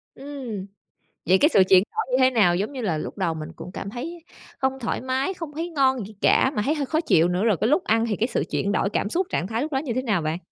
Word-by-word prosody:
Ừm, 265 Hz, -8 st, -6 dB, 0.6 s
vậy 185 Hz, -, +5 dB
cái 295 Hz, -, +4 dB
sự 195 Hz, -, +5 dB
chuyển 185 Hz, 0 st, +7 dB
đổi 440 Hz, -, -2 dB
như 255 Hz, -, +3 dB
thế 255 Hz, -, +6 dB
nào? 200 Hz, -8 st, +4 dB
Giống 200 Hz, +8 st, -2 dB
như 265 Hz, -3 st, -6 dB
là 180 Hz, -9 st, -1 dB
lúc 155 Hz, -, -6 dB
đầu 180 Hz, -4 st, 0 dB
mình 155 Hz, 0 st, -6 dB
cũng 180 Hz, -, -9 dB
cảm 195 Hz, -, -6 dB
thấy 320 Hz, +9 st, -7 dB, 0.3 s
không 265 Hz, 0 st, -1 dB
thoải 235 Hz, -, -2 dB
mái, 260 Hz, +7 st, -1 dB
không 330 Hz, -5 st, -7 dB
thấy 330 Hz, +4 st, -4 dB
ngon 265 Hz, -, +1 dB
gì 215 Hz, -, -14 dB
cả, 265 Hz, -, +4 dB
mà 210 Hz, -, +1 dB
thấy 300 Hz, -, +1 dB
hơi 290 Hz, -2 st, -1 dB
khó 315 Hz, +4 st, 0 dB
chịu 170 Hz, -, +3 dB
nữa, 180 Hz, +2 st, 0 dB
rồi 220 Hz, -5 st, +3 dB
cái -, -, +3 dB
lúc 305 Hz, +8 st, +2 dB
ăn 225 Hz, +1 st, +2 dB
thì 210 Hz, -, 0 dB
cái 225 Hz, -, 0 dB
sự -, -, -1 dB
chuyển 200 Hz, -, 0 dB
đổi 200 Hz, -, +1 dB
cảm 205 Hz, -, -1 dB
xúc, 360 Hz, +6 st, 0 dB
trạng 175 Hz, -, -1 dB
thái 225 Hz, +3 st, -2 dB
lúc 305 Hz, +3 st, -3 dB
đó -, -, +1 dB
như 265 Hz, -3 st, -2 dB
thế 255 Hz, -, -1 dB
nào 210 Hz, -9 st, 0 dB
bạn? 155 Hz, +1 st, -2 dB
240 Hz, 290 wpm, -24 LUFS, 195-285 Hz, 0.6 s, chuyển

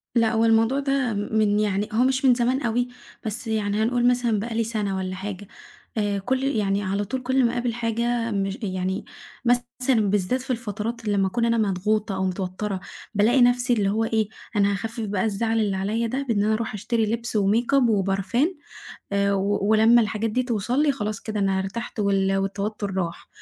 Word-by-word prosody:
لأ، 230 Hz, -2 st, +3 dB
هو 225 Hz, 0 st, +3 dB
الموضوع 225 Hz, +4 st, +3 dB
ده 275 Hz, -4 st, 0 dB
من 210 Hz, 0 st, +1 dB
يعني 205 Hz, -1 st, 0 dB
هو 230 Hz, +3 st, +3 dB
مش 265 Hz, +1 st, +1 dB
من 255 Hz, -, +7 dB
زمان 250 Hz, +3 st, +1 dB
أوي، 245 Hz, 0 st, 0 dB, 0.4 s
بس 225 Hz, +3 st, -3 dB
يعني 210 Hz, -2 st, 0 dB
هنقول 240 Hz, +1 st, +2 dB
مثلًا 240 Hz, -3 st, +2 dB
بقى 225 Hz, +2 st, -4 dB
لي 230 Hz, -, +2 dB
سنة 210 Hz, -4 st, -2 dB
والّا 185 Hz, 0 st, -3 dB
حاجة 200 Hz, +1 st, -6 dB, 0.5 s
آآ، 205 Hz, -2 st, 0 dB
كُل 260 Hz, +6 st, -1 dB
يعني 205 Hz, -7 st, 0 dB
على 200 Hz, +1 st, -1 dB
طول 260 Hz, +5 st, -3 dB
كل 260 Hz, 0 st, +2 dB
ما 235 Hz, -, +2 dB
أقابل 240 Hz, -1 st, -1 dB
حاجة 235 Hz, 0 st, -1 dB
مش 195 Hz, 0 st, -1 dB
يعني 190 Hz, +1 st, -2 dB, 0.4 s
مثلًا 245 Hz, -2 st, +1 dB
بالذات 205 Hz, +6 st, 0 dB
في 260 Hz, -, -12 dB
الفترات 230 Hz, 0 st, -4 dB
اللي 205 Hz, -1 st, +1 dB
لمّا 195 Hz, -1 st, +3 dB
أكون 230 Hz, +5 st, 0 dB
أنا 230 Hz, 0 st, +2 dB
مضغوطة 210 Hz, 0 st, 0 dB
أو 190 Hz, 0 st, -1 dB
متوترة، 190 Hz, +2 st, -3 dB, 0.4 s
بالاقي 230 Hz, +6 st, +4 dB
نفسي 245 Hz, 0 st, +4 dB
اللي 205 Hz, -4 st, +1 dB
هو 220 Hz, +3 st, +1 dB
إيه 220 Hz, -2 st, +1 dB, 0.3 s
أنا 200 Hz, -1 st, +3 dB
هاخفف 225 Hz, +3 st, -4 dB
بقى 200 Hz, -2 st, -1 dB
الزعل 225 Hz, +2 st, 0 dB
اللي 205 Hz, -3 st, +1 dB
عليّا 215 Hz, +5 st, -1 dB
ده 265 Hz, +4 st, -2 dB
بإن 205 Hz, -3 st, +2 dB
أنا 215 Hz, +1 st, +2 dB
أروح 225 Hz, +1 st, -2 dB
أشتري 225 Hz, +2 st, 0 dB
لبس 230 Hz, -1 st, -2 dB
وmakeup 235 Hz, +6 st, +3 dB
وبارفان 195 Hz, -, +1 dB, 0.6 s
آآ، 200 Hz, 0 st, +2 dB
و 200 Hz, +1 st, 0 dB
ولمّا 220 Hz, +2 st, +6 dB
الحاجات 220 Hz, +1 st, -1 dB
دي 250 Hz, +4 st, 0 dB
توصل 245 Hz, +3 st, 0 dB
لي 295 Hz, -, +3 dB
خلاص 215 Hz, -6 st, -3 dB
كده 215 Hz, -1 st, -4 dB
أنا 195 Hz, -1 st, +1 dB
ارتحت 205 Hz, +5 st, -5 dB
وال 195 Hz, -1 st, +2 dB
والتوتر 200 Hz, +1 st, -2 dB
راح، 170 Hz, -2 st, -3 dB
220 Hz, 190 wpm, -24 LUFS, 200-240 Hz, 0.6 s, من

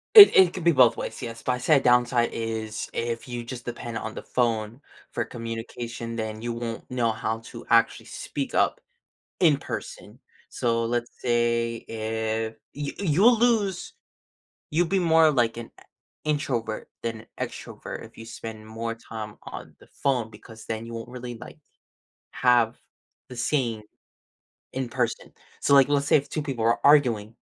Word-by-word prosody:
It 415 Hz, -2 st, +13 dB
it 185 Hz, -2 st, +7 dB
can 180 Hz, -, -5 dB
be 170 Hz, -, +6 dB
both 125 Hz, -5 st, +5 dB
ways, -, -, -5 dB
yes, 115 Hz, -2 st, -6 dB
but 125 Hz, -, +1 dB
I'd 125 Hz, 0 st, -3 dB
say 155 Hz, -, +5 dB
a 135 Hz, -, +4 dB
downside 120 Hz, -1 st, +3 dB
is 110 Hz, -1 st, -4 dB
if 115 Hz, +1 st, -3 dB
you 120 Hz, -1 st, -5 dB
just 120 Hz, 0 st, -7 dB
depend 120 Hz, -1 st, -5 dB
on 110 Hz, -, -6 dB
the -, -, -6 dB
phone 115 Hz, 0 st, -1 dB, 0.3 s
for -, -, -1 dB
communication, 115 Hz, 0 st, -6 dB
then 110 Hz, -1 st, -4 dB
you 120 Hz, +1 st, -3 dB
won't 115 Hz, 0 st, -6 dB
know 120 Hz, -3 st, +1 dB
how 110 Hz, +1 st, -3 dB
to -, -, -10 dB
actually 115 Hz, -1 st, +3 dB
speak -, -, -5 dB
up -, -, +2 dB, 0.6 s
in 155 Hz, -5 st, +5 dB
person. -, -, -7 dB, 0.3 s
So, 115 Hz, -1 st, 0 dB
let's 120 Hz, +1 st, -1 dB
say 120 Hz, -1 st, +1 dB
if 110 Hz, 0 st, -2 dB, 0.2 s
you 145 Hz, 0 st, -4 dB
you'll 200 Hz, +6 st, +4 dB
lose 215 Hz, -6 st, +1 dB, 0.8 s
you'll 170 Hz, +1 st, +3 dB
be 190 Hz, +2 st, +2 dB
more 160 Hz, -2 st, +5 dB
like 120 Hz, -4 st, +1 dB
an 120 Hz, -1 st, -7 dB
e -, -, -18 dB, 0.4 s
introvert 130 Hz, -8 st, -2 dB
than 115 Hz, -1 st, -4 dB
extrovert -, -, -6 dB
if -, -, -16 dB
you 115 Hz, -, -9 dB
spend 110 Hz, -1 st, -8 dB
more 115 Hz, +1 st, -4 dB
time 110 Hz, -2 st, -8 dB
on -, -, -9 dB
the -, -, -18 dB, 0.2 s
phone 125 Hz, -5 st, +1 dB
because 110 Hz, +1 st, -13 dB
then 110 Hz, 0 st, -4 dB
you 115 Hz, -, -8 dB
won't 115 Hz, +1 st, -6 dB
really, 125 Hz, -1 st, -7 dB
like, 120 Hz, -, -10 dB, 0.7 s
have 120 Hz, -2 st, +3 dB, 0.5 s
the 125 Hz, -, -8 dB
same 120 Hz, -6 st, 0 dB, 0.9 s
in 130 Hz, -2 st, -3 dB
person. -, -, -2 dB, 0.3 s
So, 140 Hz, -, +3 dB
like, 135 Hz, -1 st, +7 dB
let's 140 Hz, -1 st, +2 dB
say -, -, +6 dB
if 140 Hz, -, -3 dB
2 155 Hz, -, -2 dB
people 135 Hz, -6 st, -2 dB
are 115 Hz, -, +3 dB
arguing, 120 Hz, -7 st, +4 dB
120 Hz, 170 wpm, -26 LUFS, 115-135 Hz, 0.9 s, It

